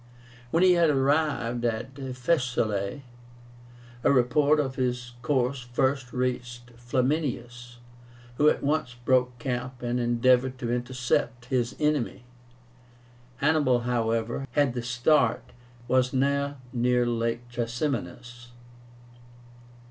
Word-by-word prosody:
When 165 +7 +2
he 185 - +6
had 170 -2 +4
arrived 135 -4 +1
at 120 +2 -2
Faesulae 125 -5 -1 1.0
a - - +4
report 140 +4 +3
of 135 -3 -1
his 125 -2 -2
course 130 0 0
first 125 +1 -1
reached 125 -1 -3
Flaminius, 120 -1 -2 0.6
who 150 +1 +5
at - - -1
once 140 -4 0
broke 125 -1 +2
camp 125 +1 -4
and 120 +1 -1
endeavored 125 +2 +2
to 120 -2 -2
intercept 125 -1 -1
his 125 -2 -1
enemy. 150 -5 0 1.1
Hannibal, 140 -2 +2
however, 115 +1 -1
had 145 -4 +2
the 120 - -3
start, 125 +1 +2
and - - -21 0.4
was 130 0 +2
now 140 +1 0 0.2
near 125 0 +2
LAKE 115 0 -2
TRASIMÉNUS. 120 - -4
125 Hz, 110 wpm, -27 LUFS, 120-135 Hz, 1.1 s, he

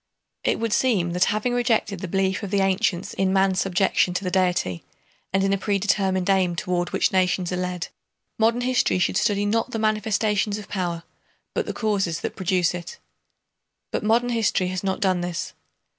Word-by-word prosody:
It - - +1
would 225 -1 -1
seem 210 -10 +2
that 180 +1 +2
having 215 +4 0
rejected 235 -5 +1
the 185 - -5
belief 190 +2 0
of 200 - -5
the 200 0 +1
ancients 195 -1 0
in 190 -1 +1
man's 190 -1 +2
subjection 185 -1 +1
to 190 - -1
the 180 - -2
Deity 180 - 0 0.5
and 195 0 +2
in 195 0 +2
a 195 - 0
predetermined 195 -2 0
aim 190 -3 +2
toward 175 +1 -1
which - - +1
nations 185 -1 +1
are - - -1
led, 180 -1 -3 0.5
modern 230 +2 +3
history 250 -5 +2
should 180 - +1
study 205 +1 +1
not 225 +4 0
the 230 - -4
manifestations 215 -1 0
of 210 - -9
power 175 -3 -3 0.5
but - - -2
the - - -1
causes 195 -7 -1
that - - -4
produce 180 -1 +1
it. 175 - -7 0.9
But - - -2
modern 235 +3 +2
history 220 -6 +1
has 185 +1 -4
not 190 +1 -1
done 185 -3 +2
this. 175 -2 -4
195 Hz, 185 wpm, -24 LUFS, 180-210 Hz, 0.9 s, modern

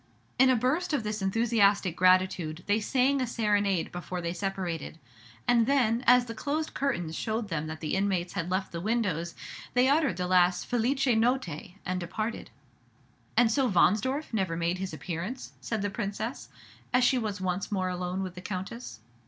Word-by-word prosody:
In 265 0 +7
a 260 - +5
burst 280 +9 0
of 280 - +1
this 210 0 -3
enthusiastic 200 -3 +2
gratitude 185 -3 +2
they 205 +2 +2
sang 265 +4 +2
a 255 - 0
serenade 205 -6 +1
before 180 +1 -5
they 170 -1 -3
separated; 180 -4 -4 0.5
and 235 -2 +4
then, 245 -4 +2
as 250 0 +7
the 230 - -6
closed 300 +6 -2
curtains 175 - -1
showed 220 +2 -2
them 155 -3 -2
that 155 0 -7
the 155 - -2
inmates 190 -3 0
had 180 -3 -3
left 190 +1 -1
the 170 - -5
windows, 185 -6 -1 0.4
they 250 +1 +5
uttered 285 - +2
the 180 - -1
last 180 0 +3
"felice 250 +3 +1
Notte," 225 - 0
and 185 0 -1
departed. 215 +6 -4 0.9
"And 235 -2 +5
so 260 +1 +2
Wahnsdorf 220 - +2
never 190 -6 0
made 170 +2 -1
his 190 0 -3
appearance?" 170 - -5
said 220 -3 -2
the 205 - -1
Princess, 210 - -4 0.4
as 250 0 +3
she 255 +1 +4
was 210 -4 -3
once 185 +2 -2
more 185 -2 0
alone 180 +1 -3
with 185 -2 -5
the 180 - -9
Countess. 185 - -6
200 Hz, 175 wpm, -28 LUFS, 180-240 Hz, 0.9 s, In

